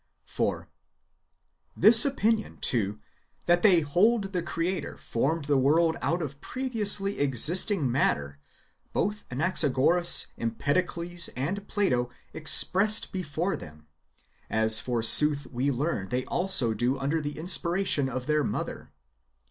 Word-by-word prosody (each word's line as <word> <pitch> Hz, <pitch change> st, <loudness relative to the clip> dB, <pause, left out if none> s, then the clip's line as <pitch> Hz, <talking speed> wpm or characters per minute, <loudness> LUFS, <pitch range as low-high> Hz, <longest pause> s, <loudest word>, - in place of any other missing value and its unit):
4. -, -, -4 dB, 1.1 s
This 225 Hz, +3 st, +7 dB
opinion, 225 Hz, -5 st, -1 dB
too, 105 Hz, -4 st, -1 dB, 0.5 s
that 175 Hz, 0 st, +2 dB
they 185 Hz, -6 st, +4 dB
hold 195 Hz, +7 st, 0 dB
the 180 Hz, -, -2 dB
Creator 170 Hz, 0 st, -5 dB
formed 140 Hz, +6 st, -3 dB
the 140 Hz, -1 st, +1 dB
world 160 Hz, +5 st, +1 dB
out 170 Hz, +1 st, -2 dB
of 140 Hz, -1 st, -9 dB
previously 210 Hz, -6 st, +1 dB
existing 145 Hz, -, +2 dB
matter, 70 Hz, -, -2 dB, 0.5 s
both 210 Hz, +1 st, -3 dB
Anaxagoras, 160 Hz, +3 st, +3 dB
Empedocles, 170 Hz, +8 st, -1 dB
and 185 Hz, +10 st, -5 dB
Plato 125 Hz, -, -1 dB, 0.2 s
expressed 190 Hz, +6 st, +3 dB
before 180 Hz, +1 st, -4 dB
them; 75 Hz, 0 st, -13 dB, 0.6 s
as, 110 Hz, 0 st, +3 dB
forsooth, 140 Hz, +5 st, +2 dB
we 130 Hz, +3 st, -2 dB
learn 130 Hz, -, -3 dB
they 125 Hz, +1 st, -3 dB
also 175 Hz, -11 st, +1 dB
do 125 Hz, +4 st, -2 dB
under 145 Hz, +4 st, -2 dB
the 145 Hz, 0 st, -7 dB
inspiration 170 Hz, -3 st, 0 dB
of 130 Hz, -1 st, -6 dB
their 150 Hz, 0 st, 0 dB
Mother. -, -, -6 dB
155 Hz, 115 wpm, -26 LUFS, 130-185 Hz, 1.1 s, This